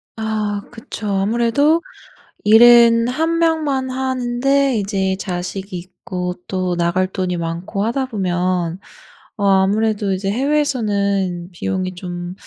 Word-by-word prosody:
아 215 -2 -2
그쵸. 225 -1 -7
아무래도 235 +11 +2 0.6
일은 230 +1 +7
1 325 +5 0
명만 305 -6 +1
하는데 260 +1 0
이제 195 -2 -1
자식이 185 +1 -5
있고 180 0 -6
또 185 -2 -1
나갈 175 +2 +1
돈이 185 -1 -2
많고 170 +4 -3
하다 250 +4 0
보면 180 -5 -1 0.6
어 200 - -1
아무래도 200 +1 +2
이제 195 +1 -1
해외에서는 205 -10 0
비용이 185 +1 -3
좀 175 -1 -6
200 Hz, 230 characters per minute, -19 LUFS, 185-240 Hz, 0.6 s, 일은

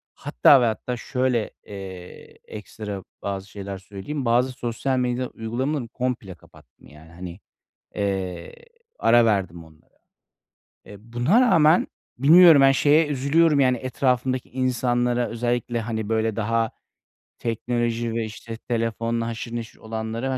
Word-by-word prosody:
Hatta 130 - +4
ve - - +3
hatta 120 +2 -2
şöyle, 125 -3 -1
eee, 95 -3 -10
ekstra 105 -2 -7 0.2
bazı 100 0 -4
şeyler 100 -1 -7
söyleyeyim. 100 +9 -6
Bazı 125 +2 +2
sosyal 125 +1 -2
medya 125 0 -1
uygulamaları 120 +4 -3
komple 125 -7 -4
kapattım, - - -21
yani. 80 +2 -16
Hani, 90 +2 -9 0.6
eee, 95 -4 -3 0.4
ara 120 -1 +5
verdim 95 -6 -1
onlara. 80 -1 -22 0.9
E, 105 +3 -14
buna 140 - +3
rağmen 170 -8 +4 0.3
bilmiyorum, 160 +2 +8
ben 135 - +6
şeye 150 +3 +4
üzülüyorum, 145 +2 +2
yani, 130 -2 +3
etrafımdaki 130 0 -1
insanlara, 125 -1 0
özellikle, 120 0 -2
hani, 110 -2 -4
böyle, 110 -1 0
daha 115 +1 0 0.7
teknoloji 120 0 -2
ve, 115 -1 -1
işte, 110 +1 -8
telefonla 115 0 -2
haşır 115 +1 -5
neşir 115 -1 -6
olanlara, 115 +4 -3
115 Hz, 125 wpm, -23 LUFS, 105-130 Hz, 0.9 s, bilmiyorum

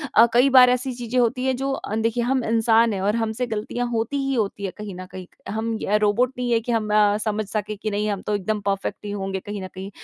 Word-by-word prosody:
अ, 230 - +8
कई 250 +3 +5
बार 255 -1 +8
ऐसी 250 +1 0
चीजें 240 0 -4
होती 250 +2 +1
हैं 260 -1 +1
जो 270 +1 -2
अ, 215 -5 -4
देखिए 230 +2 0
हम 255 0 +1
इंसान 225 0 +3
हैं 190 - -3
और 205 +3 +1
हमसे 230 +2 -1
गलतियाँ 225 +3 -3
होती 230 +4 -1
ही 275 - 0
होती 205 -2 -2
है 190 - -3
कहीं 210 -3 -7
न 185 0 -7
कहीं, 185 -1 -8 0.2
हम 225 +2 -2
य 210 +1 +2
रोबोट 240 +5 +2
नहीं 245 -1 -2
है 230 - +4
कि 240 - -3
हम 220 -2 0
अ, 210 -1 +4
समझ 215 0 -1
सके 215 0 -3
कि 215 +1 -4
नहीं 210 +1 -1
हम 200 -2 -2
तो 210 - -1
एकदम 210 +2 -1
परफ़ेक्ट 200 +1 -2
ही 205 - -4
होंगे 195 -1 -3
कहीं 205 0 -6
न - - -5
कहीं। 190 +1 -6
220 Hz, 265 wpm, -23 LUFS, 205-240 Hz, 0.2 s, अ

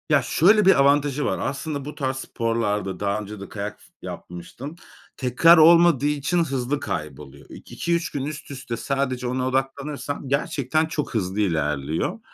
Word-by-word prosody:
Ya 150 -3 +4
şöyle 205 - +4
bir 190 - +7
avantajı 145 +1 +3
var. - - -1
Aslında 140 0 -3
bu 150 - -7
tarz 130 -2 -2
sporlarda 105 -7 -2
daha 100 +1 -1
önce 105 0 -8
de 100 - -9
kayak 105 0 -6
s - - -21
yapmıştım. 105 - -8 0.4
Tekrar 135 +7 +5
olmadığı 165 -3 +6
için 150 +4 +1
hızlı 135 -1 -2
kayboluyor. 75 - -6
İk - - -13
iki 170 - -2
3 170 0 -2
gün 140 -2 -3
üst 150 0 -7
üste 130 -4 -5
sadece 130 -2 -2
ona 130 +1 -1
odaklanırsan 140 +2 -3
gerçekten 150 +1 0
çok 155 -2 -4
hızlı 100 -2 -2
ilerliyor. 75 -5 -1
135 Hz, 160 wpm, -23 LUFS, 105-150 Hz, 0.4 s, bir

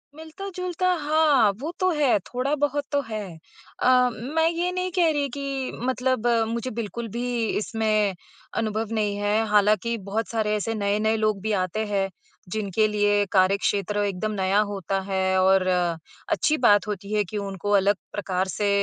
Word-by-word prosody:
मिलता-जुलता, 365 +2 -4
हाँ, 295 -7 +4
वो 310 +5 -4
तो 370 0 +3
है, 290 -8 +3
थोड़ा 255 +8 -3
बहुत 290 0 0
तो 285 0 +2
है। 215 -2 -4 0.6
अ, 250 0 +4
मैं 300 +9 0
ये 345 +2 -1
नहीं 365 0 -2
कह 345 -2 +3
रही 285 -2 -1
कि 275 -1 -4 0.2
मतलब 255 -2 0 0.2
मुझे 235 +2 -3
बिल्कुल 230 +1 -4
भी 240 -2 -1
इसमें 215 -2 0 0.4
अनुभव 220 0 -1
नहीं 210 -2 0
है, 210 +2 +1
हालाँकि 210 +2 +2
बहुत 225 +2 -1
सारे 215 -2 0
ऐसे 225 +2 -2
नए-नए 215 +1 +1
लोग 215 -3 0
भी 220 +1 -2
आते 215 +5 -2
हैं, 195 -2 -1 0.4
जिनके 215 +1 0
लिए 205 -1 +2
कार्यक्षेत्र 200 +1 +2
एकदम 200 +2 -2
नया 195 0 +1
होता 195 0 -2
है 190 0 +1
और 190 0 +4 0.6
अच्छी 310 0 +2
बात 205 -4 +4
होती 205 0 -5
है 210 -1 +2
कि 215 - -4
उनको 200 0 -4
अलग 200 +1 +3 0.2
प्रकार 190 -2 -1
से 200 +3 -1
215 Hz, 160 wpm, -24 LUFS, 205-260 Hz, 0.6 s, हाँ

